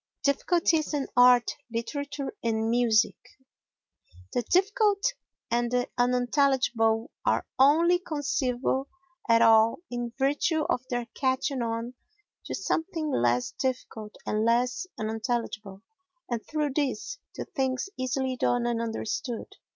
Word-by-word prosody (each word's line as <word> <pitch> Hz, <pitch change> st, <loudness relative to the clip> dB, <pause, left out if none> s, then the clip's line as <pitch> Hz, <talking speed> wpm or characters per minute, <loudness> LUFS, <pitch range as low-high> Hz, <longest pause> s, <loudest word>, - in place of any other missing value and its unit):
Difficulties 315 Hz, +2 st, +2 dB
in 280 Hz, -2 st, -1 dB
Art, 245 Hz, -1 st, +5 dB
Literature 280 Hz, +4 st, -4 dB
and 225 Hz, -1 st, 0 dB
Music 230 Hz, -2 st, +3 dB, 1.2 s
The -, -, +1 dB
difficult 405 Hz, -, +2 dB, 0.4 s
and 240 Hz, 0 st, +1 dB
the 245 Hz, 0 st, 0 dB
unintelligible 245 Hz, -1 st, +2 dB
are -, -, +1 dB
only 330 Hz, +6 st, +5 dB
conceivable 275 Hz, -5 st, -1 dB, 0.4 s
at 230 Hz, 0 st, +6 dB
all 225 Hz, 0 st, +5 dB
in 240 Hz, -1 st, -3 dB
virtue 290 Hz, +4 st, +1 dB
of -, -, 0 dB
their 245 Hz, -1 st, -1 dB
catching 260 Hz, 0 st, 0 dB
on 230 Hz, +1 st, -3 dB, 0.5 s
to -, -, -4 dB
something 320 Hz, -3 st, -2 dB
less 120 Hz, -, +1 dB
difficult 230 Hz, -5 st, -4 dB
and 215 Hz, 0 st, 0 dB
less 245 Hz, +8 st, +1 dB
unintelligible 220 Hz, -2 st, -3 dB, 0.4 s
and, 235 Hz, -2 st, -3 dB
through 300 Hz, -2 st, -1 dB
this, 295 Hz, -, -2 dB, 0.2 s
to -, -, -5 dB
things 260 Hz, +2 st, -2 dB
easily 260 Hz, 0 st, -1 dB
done 245 Hz, 0 st, +1 dB
and 235 Hz, -1 st, 0 dB
understood. 230 Hz, +2 st, -4 dB
250 Hz, 115 wpm, -27 LUFS, 230-285 Hz, 1.2 s, at